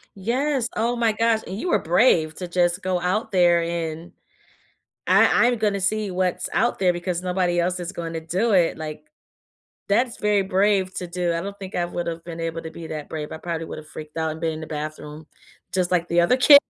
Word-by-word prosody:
Yes, 250 +5 0
oh 235 +3 0
my 230 -2 +2
gosh, 225 0 +2
and 190 - -5
you 355 - -3
were - - +3
brave 165 -3 +3
to 180 - -5
just 175 +1 +1
go 185 -1 0
out 185 +6 -1
there 175 -2 +4
and 165 0 -4 1.0
"I 240 - +5
I'm 245 -1 +1
gonna 205 -2 +1
see 205 +1 0
what's 180 0 -1
out 235 -1 +1
there 185 -2 +4
because 175 0 -3
nobody 180 -1 0
else 180 +1 -1
is 175 +2 -5
going 165 -1 -5
to 165 - -2
do 185 +8 0
it," 175 -5 +3
like, 155 -1 -7 0.8
that's 235 +4 +2
very 210 -1 +2
brave 190 0 +1
to 180 - -4
do, 175 -1 -1
I 170 - -2
don't 200 +1 -6
think 190 -1 -8
I 175 - +1
would 175 0 -4
have 165 0 -4
been 165 -1 -7
able 165 0 -3
to 160 - -7
be 165 -1 -8
that 155 -2 -6
brave, 150 -1 -5
I - - -5
probably 165 -1 -4
would - - -7
have 155 - -10
freaked 155 +1 -10
out 160 -1 0
and 160 - -9
been 165 -1 0
in 155 - -7
the - - -6
bathroom, 155 0 -6 0.5
just 185 -1 0
like 175 -1 +1
the 170 0 +3
other 250 +10 +3
ki 285 +3 +9
180 Hz, 225 wpm, -23 LUFS, 165-200 Hz, 1.0 s, ki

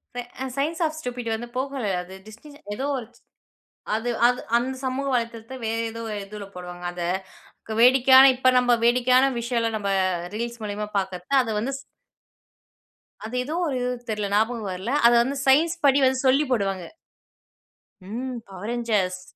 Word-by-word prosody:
Pay 245 - -2 0.4
science 315 +5 -1
of 310 0 -2
stupid 245 -4 -5
வந்து 240 +2 -6
Pogoல, 265 -2 -2 0.2
அது 180 +1 -11
டிஸ்டின் 285 +7 -13 0.2
ஏதோ 265 +5 -3
ஒரு 230 -4 -6
சி - - -28 0.7
அது 230 +2 -2 0.2
அது 250 0 +1 0.2
அந்த 260 +2 -2
சமூக 270 +2 -2
வலைத்தளத்தை 230 +1 -3
வேறு 225 +1 -1
ஏதோ 230 - -8
ஒரு 210 - -3
இதுல 205 0 -8
போடுவாங்க. 180 0 -8
அதை 175 -1 -3 0.8
வேடிக்கையான 265 +1 +8
இப்ப 255 0 +4
நம்ப 245 -1 +3
வேடிக்கையான 250 +2 +4
விஷயங்கள 235 -1 0
நம்ம 200 -1 -2 0.5
ரீல்ஸ் 235 +1 -4
மூலியமா 210 0 -3
பார்க்குறது 190 +6 -2
அது 230 - -4
வந்து 245 +6 -2 1.5
அது 225 +3 -6
ஏதோ 300 - -5
ஒரு 275 - -2
இது, 250 - -1 0.2
தெரில 210 -2 -1
ஞாபகம் 220 0 +1
வரல. 190 +7 -4
அத 240 - +7
வந்து 275 +2 -3
சயன்ஸ் 320 +6 +4
படி 275 0 +5
வந்து 260 0 +2
சொல்லி 275 +3 +4
போடுவாங்க. 195 -6 0 1.2
ம், 240 +5 -5
Power 195 +1 -9
Rangers. 210 -6 -1
240 Hz, 155 wpm, -24 LUFS, 210-260 Hz, 1.5 s, வேடிக்கையான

